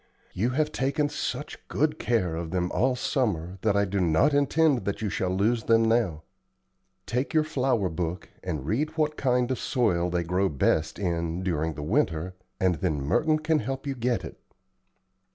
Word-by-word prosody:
You 110 +7 0
have 150 +4 0
taken 145 +3 0
such 145 -1 -4
good 155 +1 0
care 95 -9 0
of 85 0 -4
them 90 0 -1
all 130 +2 +2
summer 95 - -1
that 105 -2 +2
I 100 - +3
do 100 +1 -2
not 90 - +3
intend 145 -2 +3
that 100 +2 -2
you 105 - -1
shall 95 - -1
lose 110 +5 +1
them 115 0 +4
now. 110 -9 +1 0.8
Take 125 +6 -2
your 155 - +5
flower 130 -9 0
book 85 +1 -3 0.2
and 80 -7 -3
read 150 - -1
what 155 -1 +1
kind 125 -2 +1
of 130 - -1
soil 90 -9 +1
they 90 0 0
grow 90 +3 +1
best 80 +2 +1
in 85 -2 -2
during 80 -3 -1
the 75 - -5
winter, 80 +3 0 0.3
and 90 -4 +1
then 80 -6 0
Merton 155 - +2
can 155 0 +1
help 135 +4 -4
you 140 - -1
get 125 -1 -1
it." - - -10
105 Hz, 180 wpm, -27 LUFS, 90-135 Hz, 0.8 s, your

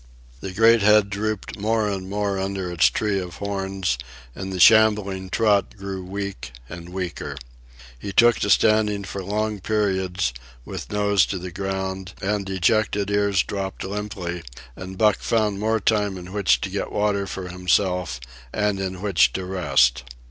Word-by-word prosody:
The 95 - -6
great 115 +3 +5
head 105 -1 +5
drooped 105 +1 -3
more 110 +1 +1
and 95 -2 -4
more 100 -1 -1
under 95 -2 -3
its 85 -1 +4
tree 105 -2 -1
of 90 -2 -6
horns, 95 -8 -2 0.3
and 95 +6 -6
the 95 - -4
shambling 105 -2 +5
trot 105 -1 +1
grew 95 -1 -5
weak 95 -8 -6
and 85 +2 -9
weaker. 90 -6 -5 0.6
He 100 - -5
took 120 +4 +5
to 105 - -1
standing 105 -1 +3
for 100 0 -6
long 105 +2 -2
periods, 95 - 0 0.3
with - - -7
nose 100 -3 +3
to 95 - -3
the 90 0 -6
ground 95 0 -4
and 100 0 -2
dejected 100 +2 +1
ears 100 -2 +2
dropped 95 -1 -4
limply; 95 -3 -4 0.3
and 95 0 -8
Buck 105 -1 +3
found 105 -3 0
more 110 +1 +1
time 105 -2 +1
in 90 +1 -9
which 90 -12 +2
to - - -3
get - - -3
water 105 -1 0
for 95 -1 -6
himself 90 -5 0 0.3
and 105 -2 0
in 95 0 -4
which 100 -6 +3
to 95 - -3
rest. 85 -10 +2
100 Hz, 160 wpm, -23 LUFS, 95-105 Hz, 0.6 s, great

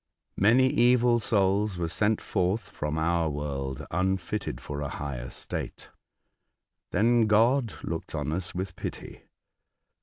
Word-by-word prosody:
Many 115 +6 +5
evil 120 -1 +4
souls 100 -2 +1
were 85 -1 -1
sent 105 +5 +1
forth 95 +3 -1
from 75 +1 -3
our 85 0 +1
world 70 -1 -4
unfitted 95 +3 -1
for 75 0 -6
a 70 - -3
higher 65 -4 -5
state. - - -5 1.0
Then 115 +3 +3
God 115 +2 +3
looked 80 -1 -4
on 75 -1 -2
us 90 +3 -3
with 90 0 -4
pity. - - -7
95 Hz, 125 wpm, -28 LUFS, 80-110 Hz, 1.0 s, Many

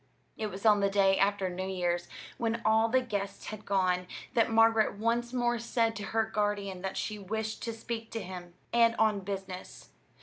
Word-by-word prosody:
It 215 - -3
was 195 +1 -8
on 210 -2 +6
the 200 0 +2
day 195 -1 +3
after 200 -1 +2
New 185 +1 -4
Year's, 175 -2 -1 0.3
when 230 0 0
all 220 +1 +4
the 260 +2 +3
guests 200 -5 -4
had 215 -1 -8
gone, 185 -2 +1 0.3
that 230 -1 +3
Margaret 225 -1 +4
once 235 +2 0
more 240 -1 +1
said 230 -1 0
to 205 - -5
her 225 +2 +1
guardian 205 -3 -2
that 190 0 -4
she 215 -1 -3
wished 220 +3 -3
to 230 - -3
speak 225 0 -5
to 225 - -2
him, 175 -1 -8 0.2
and 230 -1 +5
on 215 -2 +3
business. 190 -1 -7
210 Hz, 190 wpm, -30 LUFS, 195-225 Hz, 0.3 s, on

